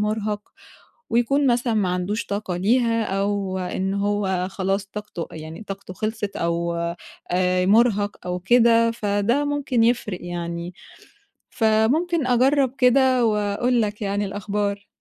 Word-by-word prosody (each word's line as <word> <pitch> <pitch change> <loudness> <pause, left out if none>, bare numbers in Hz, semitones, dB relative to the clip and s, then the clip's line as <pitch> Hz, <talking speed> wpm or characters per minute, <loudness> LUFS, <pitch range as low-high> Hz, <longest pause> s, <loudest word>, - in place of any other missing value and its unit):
مرهق 210 0 -1 0.7
ويكون 265 +4 +2
مثلًا 240 -1 +1
ما 205 -4 +1
عندوش 180 +5 -2
طاقة 200 -3 -3
ليها، 230 +3 +2
أو 195 -1 -1
إن 190 +1 -2
هو 200 -2 0
خلاص 195 +1 -1
طاقته 210 -4 -7
يعني 160 +5 -8
طاقته 195 -2 -8
خلصت 215 +1 -3
أو 170 0 -1 0.6
آآ 180 0 +2
مرهق 205 0 +3
أو 180 0 -2
كده، 230 +3 +4
فده 225 +5 0
ممكن 280 -5 0
يفرق 225 -5 +1
يعني، 175 0 -5 0.8
فممكن 255 +9 +2
أجرّب 260 +1 +3
كده 255 -1 +4
وأقول 215 +3 +1
لك 210 0 -3
يعني 205 0 -1
الأخبار. 200 +1 -3
205 Hz, 125 wpm, -23 LUFS, 190-235 Hz, 0.8 s, كده